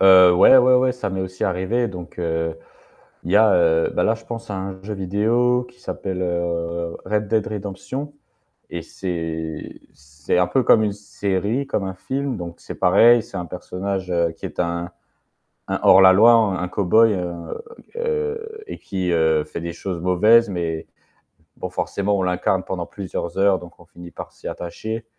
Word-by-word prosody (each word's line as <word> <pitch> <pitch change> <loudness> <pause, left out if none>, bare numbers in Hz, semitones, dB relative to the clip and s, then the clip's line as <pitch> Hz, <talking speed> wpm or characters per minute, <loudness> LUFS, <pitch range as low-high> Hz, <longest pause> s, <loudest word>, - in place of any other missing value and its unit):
Heu, 95 -2 +8
ouais, 90 +8 +7
ouais, 125 0 +6
ouais 130 0 +2
ça 125 -5 -4
m'est 95 0 -3
aussi 95 0 -6
arrivé 95 +6 0
donc 90 -3 -10
heu, 80 -1 -2 0.7
il 85 - -4
y - - +4
a, 110 -1 +6
heu, 80 -2 +3
bah, - - +1
là 110 - +3
je 115 - -15
penseà 115 -2 -6
un 95 0 -6
jeu 105 +2 -6
vidéo 115 +6 +1
qui 125 0 -22
s'appelle, 95 -1 -4
heu, 85 -1 -2
Red 105 0 -1
Dead 110 0 +1
Redemption 105 +8 -6 0.6
et 85 - -5
c'est 80 -3 -5
c'est 75 +2 -4
un 90 - +3
peu 130 +8 +1
comme 110 -1 +5
une 105 -2 0
série, 105 +5 -2
comme 105 - -1
un 95 - -4
film 135 +6 -3
donc 85 -1 -7
c'est - - -9
pareil, 115 +6 +5
c'est 100 - -9
un 90 - -4
personnage, 90 +2 -5
heu, 85 -1 +1
qui 80 - -10
est - - -8
un 85 0 -2 0.8
un - - 0
hors 95 - +7
la 95 0 +8
loi, 115 +5 +7
un 100 -6 +2
cow-boy, 105 +4 +3
heu 85 - -5 0.3
heu 455 -1 -3
et - - -7
qui, 95 -2 -3
heu, 80 -2 +2
fait 75 - -7
des 85 0 -5
choses 85 0 -5
mauvaises 105 +6 +4
mais 85 -4 -3 0.7
bon 90 - -5
forcément 100 +2 -1
on - - -1
l'incarne 90 +1 0
pendant 90 -2 -4
plusieurs 90 -3 -6
heures 95 -1 +3
donc 85 -1 -13
on 85 - -16
finit 85 +1 -13
par - - -9
s'y - - -10
attacher, 110 +6 -5
95 Hz, 185 wpm, -21 LUFS, 85-110 Hz, 0.8 s, Heu